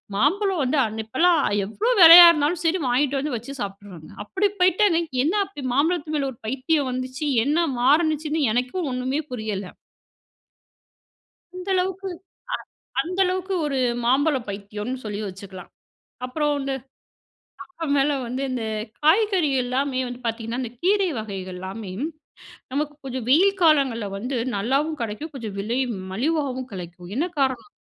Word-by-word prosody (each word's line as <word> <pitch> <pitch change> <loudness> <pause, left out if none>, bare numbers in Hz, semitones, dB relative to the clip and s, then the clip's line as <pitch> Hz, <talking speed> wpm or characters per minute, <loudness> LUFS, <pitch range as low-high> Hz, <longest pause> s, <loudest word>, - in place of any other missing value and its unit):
மாம்பழம் 365 - +1
வந்து 270 +3 +1
அன் 220 0 -4
இப்பலாம் 325 +7 +3 0.3
எவ்வளோ 430 - -1
வெலையா 340 +1 +12
இருந்தாலும் 310 +2 0
சரி 330 +1 +2
வாங்கிட்டு 275 +3 +1
வந்து 280 -2 -2
வச்சு 255 +5 -8
சாப்பிடுறோங்க. 195 -5 -8
அப்படி 395 - 0
போயிட்டேங்க. 365 -1 +4 0.2
என்ன 325 - +1
அப்படி 375 -8 -10
மாம்பழத்து 310 +2 0
மேல 275 -2 -1
ஒரு 230 - -23
பைத்தியம் 270 +3 0
வந்துச்சு, 255 +4 -4 0.2
என்ன 325 +4 +2
மாருணுச்சுன்னு 310 +2 +2
எனக்கும் 255 +8 -1
ஒண்ணுமே 260 +4 -1
புரியல. 215 -4 -3 1.9
அந்த 365 +1 -8
அளவுக்கு 380 +1 -1 0.9
அ - - +5
அந்த 365 +3 -5
அளவுக்கு 370 +1 -2
ஒரு 280 -2 -1 0.3
மாம்பழம் 270 0 +2
பைத்தியோனு 210 +5 -5
சொல்லி 210 -1 -4
வச்சுக்கலாம். 190 -1 -10 0.6
அப்புறம் 295 +3 0
இந்த 275 0 -2 0.9
அப்புறமேல 290 -5 0
வந்து 255 +3 -4
இந்த 250 -3 -3 0.4
காய்கறி 365 0 +3
எல்லாமே 260 +1 -1
வந்து 245 0 -8
பாத்தீங்கன்னா, 230 +2 -3
இந்த 235 - -5
கீரை 390 +1 +3
வகைகள்லாமே 190 -1 -6 0.8
நமக்கு 295 +2 -2
கொஞ்சம் 255 -3 -4
வெயில் 370 +9 +5
காலங்கள்ல 275 -9 +3
வந்து 250 +5 -3 0.2
நல்லாவும் 275 +9 0
கெடைக்கும், 230 +8 -5
கொஞ்சம் 220 -6 -6
விலையும் 240 +3 -1 0.2
மலிவாவும் 260 +1 -1
கிடைக்கும். 175 -1 -9
என்ன 325 +5 +1
காரணம் 265 +8 0
275 Hz, 130 wpm, -23 LUFS, 230-325 Hz, 1.9 s, வெலையா